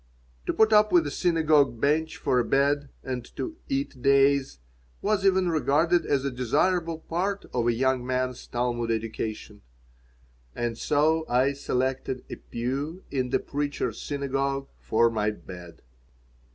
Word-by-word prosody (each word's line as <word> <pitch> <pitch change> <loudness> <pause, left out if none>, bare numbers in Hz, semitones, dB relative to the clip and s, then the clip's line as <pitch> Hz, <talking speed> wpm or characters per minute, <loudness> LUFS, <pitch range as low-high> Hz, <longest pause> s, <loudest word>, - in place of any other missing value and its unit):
To - - +1
put 220 0 +4
up 215 0 +5
with 170 -3 +5
a 145 - -3
synagogue 155 -7 +2
bench 155 +4 +1
for 125 - +1
a - - +2
bed 140 +2 +1
and 125 -2 -4
to 320 -2 -5
"eat 275 - -2
days" 140 0 +3 0.4
was 205 -1 0
even 190 -2 +3
regarded 160 +3 +2
as 140 -1 +1
a 140 - 0
desirable 165 +7 +1
part 195 +5 -2
of 120 -1 0
a - - +4
young 130 +1 +1
man's 130 0 -2
Talmud 120 -1 -1
education. 110 -2 -4 0.9
And 120 -1 -2
so 155 +6 +2
I 130 +3 +3
selected 130 -1 -2
a - - -5
pew 140 +9 -4
in 130 -2 -1
the - - +2
Preacher's 145 -5 -3
Synagogue 140 -1 -2
for 115 +1 +2
my 105 -1 0
bed. 90 -5 -10
140 Hz, 145 wpm, -26 LUFS, 125-160 Hz, 0.9 s, up